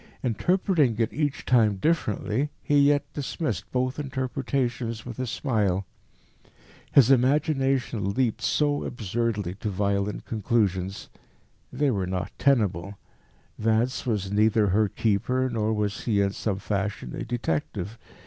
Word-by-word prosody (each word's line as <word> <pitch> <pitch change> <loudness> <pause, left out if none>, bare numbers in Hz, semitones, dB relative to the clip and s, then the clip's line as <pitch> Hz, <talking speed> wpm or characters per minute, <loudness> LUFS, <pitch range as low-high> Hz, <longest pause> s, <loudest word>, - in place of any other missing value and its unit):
Interpreting 150 - +2
it 115 -1 0
each 145 -1 -2
time 110 -5 +4
differently, 135 - 0
he 145 -1 +4
yet 145 0 +3
dismissed 130 - -3
both 130 +2 -1
interpretations 130 -4 -2
with 120 -1 -7
a 130 - -2
smile. 105 -7 0 1.1
His 135 -2 +6
imagination 135 - +2
leaped 125 -4 0
so 145 -1 +1
absurdly 110 -4 -2
to 105 - -2
violent 100 +1 -1
conclusions. 100 -4 -1 0.6
They 145 -2 +1
were 95 -5 -1
not 90 -1 -3
tenable: 100 -8 +1 0.6
Vance 115 +4 +1
was 100 -4 -1
neither 105 0 +3
her 105 +3 +3
keeper, 125 +6 0
nor 110 -2 0
was 105 -2 -2
he 105 -4 +2
in 100 0 +2
some 100 -1 -2
fashion 100 - -3
a - - -4
detective. 105 -1 -3
115 Hz, 125 wpm, -26 LUFS, 100-130 Hz, 1.1 s, His